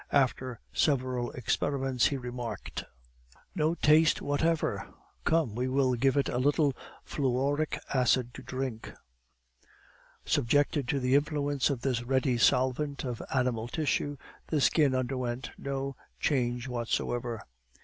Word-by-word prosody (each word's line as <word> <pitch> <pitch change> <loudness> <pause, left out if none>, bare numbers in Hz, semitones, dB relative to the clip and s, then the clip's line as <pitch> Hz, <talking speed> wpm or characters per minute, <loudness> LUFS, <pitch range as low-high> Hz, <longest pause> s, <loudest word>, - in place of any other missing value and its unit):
After 130 -3 +1
several 130 -4 +1
experiments, 135 +1 +1
he 140 - -1
remarked: 125 -2 -5 0.7
"No 160 0 +1
taste 155 0 +5
whatever! 155 +3 0 0.3
Come, 160 -9 +2
we 125 +3 -1
will 130 -1 +2
give 135 +3 +2
it 140 - +2
a 125 - -1
little 145 +1 +3 0.3
fluoric 140 +3 0 0.2
acid 125 -1 +2
to - - -9
drink." 130 -3 -5 1.3
Subjected 145 +2 +2
to 140 - +1
the 125 0 +1
influence 145 -1 +2
of 135 -4 -2
this 125 -3 0
ready 130 0 +1
solvent 130 +4 +2
of 125 -3 -4
animal 125 -4 0
tissue, 145 +1 -1 0.3
the 155 - +1
skin 140 -1 +3
underwent 130 -1 -2
no 135 0 -4 0.2
change 125 -3 0
whatsoever. 120 -1 -2
130 Hz, 120 wpm, -30 LUFS, 125-145 Hz, 1.3 s, taste